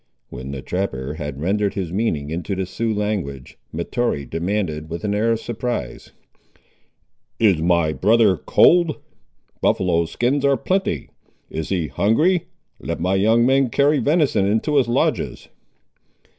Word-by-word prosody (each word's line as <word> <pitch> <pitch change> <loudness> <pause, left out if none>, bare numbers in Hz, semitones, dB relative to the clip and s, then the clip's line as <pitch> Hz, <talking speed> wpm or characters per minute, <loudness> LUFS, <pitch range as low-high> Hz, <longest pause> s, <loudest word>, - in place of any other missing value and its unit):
When 65 +2 -8
the 70 -1 -6
trapper 75 -6 -3
had 75 -3 -6
rendered 100 +4 0
his 90 -4 -3
meaning 80 -9 -1
into 90 +4 -3
the 95 0 -2
Sioux 110 +5 -2
language, 100 -11 -3
Mahtoree 85 - -2
demanded, 80 -1 -3
with 85 0 -6
an 105 -1 -1
air 110 +3 +1
of 115 - -2
surprise— 120 - -4 1.3
"Is 100 -8 +3
my 85 -2 +2
brother 105 0 +4
cold? 170 - +4 0.6
buffaloe 85 -3 +2
skins 125 - 0
are 140 -1 +3
plenty. 185 - -1 0.4
Is 80 - -4
he 90 -4 0
hungry? 155 - +2 0.3
Let - - -4
my 90 +3 0
young 110 +5 +3
men 135 0 +3
carry 140 +4 +3
venison 145 - +2
into 110 +9 +1
his 130 - +3
lodges." 120 - -1
100 Hz, 140 wpm, -21 LUFS, 80-120 Hz, 1.3 s, brother